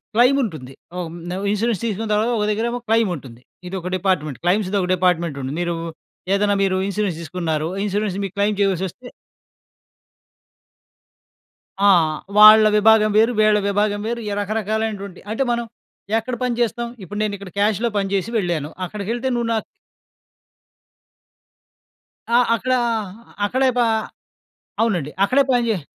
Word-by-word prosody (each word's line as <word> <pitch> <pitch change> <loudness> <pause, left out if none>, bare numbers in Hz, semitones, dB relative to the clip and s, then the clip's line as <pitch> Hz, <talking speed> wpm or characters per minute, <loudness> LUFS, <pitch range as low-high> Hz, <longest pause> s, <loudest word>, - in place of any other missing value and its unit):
Claim 250 +4 +5
ఉంటుంది. 150 - -6 0.2
ఆహ్, 175 -2 -4
హ్మ్. 170 +2 -9 0.3
ఇన్సూరెన్స్ 215 0 0
తీసుకున్న 220 0 -2
తర్వాత, 215 +3 +1
ఒక 210 - 0
దగ్గరేమో 235 +3 -1
క్లైముంటుంది. 175 - -1 0.3
ఇదొక 180 -1 -5
డిపార్ట్‌మెంట్ 165 -8 -1
క్లైమ్స్‌ది. 190 +2 +1
ఒక 180 - -2
డిపార్ట్మెంట్ 170 -4 0
ఉంటుంది. 135 +2 -4
మీరేదైనా 175 +4 -2
మీరు 190 -1 +1
ఇన్సూరెన్స్‌ 200 -4 -2
దీసుకున్నారు. 160 -1 -2 0.2
ఇన్సూరెన్స్‌ 205 -1 -1
మీకు 195 0 -8
క్లైమ్ 205 +1 +1
చేయావల్సి 190 -2 +1
వస్తే 250 +8 -14 2.7
ఆ! 205 - +6 0.5
వాళ్ళ 215 +1 +10
విభాగం 215 0 +5
వేరు. 225 +3 +4
వీళ్ళ 215 -1 +4
విభాగం 205 0 0
వేరు. 235 +1 -2
ఈ - - -3
రకరకాలైనటువంటి 215 -2 -3
అంటే, 270 +5 0
మనం 235 0 -1 0.5
ఎక్కడ 240 +3 -3
పని 250 - 0
జేస్తాం. 235 0 0 0.2
ఇప్పుడు 205 +4 -6
నేనిక్కడ 200 -2 -4
క్యాష్‌లో 215 +3 +1
పనిజేసి 200 +2 -1
వెళ్ళాను. 170 -7 -1 0.2
అక్కడికెళ్తే 215 +6 -4
నువ్వు 235 -1 -1
నా - - +1 2.7
ఆ! - - +4 0.2
అక్కడ 255 +3 -1 0.7
అక్కడే 260 +5 +1
ప - - +3 1.0
అవునండి. 180 -11 0
అక్కడే 270 +7 +3
పని 245 -2 +2
జేస్ 185 -9 -2
205 Hz, 125 wpm, -21 LUFS, 180-225 Hz, 2.7 s, వాళ్ళ